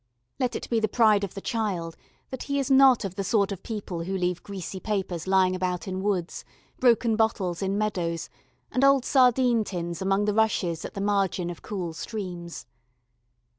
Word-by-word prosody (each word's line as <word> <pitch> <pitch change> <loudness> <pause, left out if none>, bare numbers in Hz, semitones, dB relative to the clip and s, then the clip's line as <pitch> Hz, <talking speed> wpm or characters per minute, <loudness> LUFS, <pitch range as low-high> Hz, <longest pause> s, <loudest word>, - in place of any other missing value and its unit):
Let 250 -2 0
it - - -4
be 230 - +1
the 215 - +1
pride 215 -2 +4
of 195 - -5
the 195 - -6
child 190 -9 -2 0.4
that 260 - -5
he 280 - +1
is 275 0 -1
not 265 -4 +6
of 190 - -4
the 195 0 -3
sort 200 0 +1
of 195 -2 -5
people 200 -6 -5
who 190 +1 -2
leave 180 -1 -1
greasy 195 -1 -6
papers 190 -5 -3
lying 190 -1 +3
about 180 0 -2
in 190 0 -3
woods, 190 -4 -2 0.4
broken 235 -2 +3
bottles 205 -6 0
in 195 +1 0
meadows, 180 -6 -2 0.4
and 255 - 0
old 275 -2 +5
sardine 250 -3 +4
tins 170 -3 -5
among 195 +2 +1
the 210 - +1
rushes 195 -6 +1
at - - -8
the 195 - -3
margin 195 -3 0
of 170 - -10
cool 180 -5 -4
streams. 175 -3 -6
200 Hz, 185 wpm, -26 LUFS, 180-220 Hz, 0.4 s, not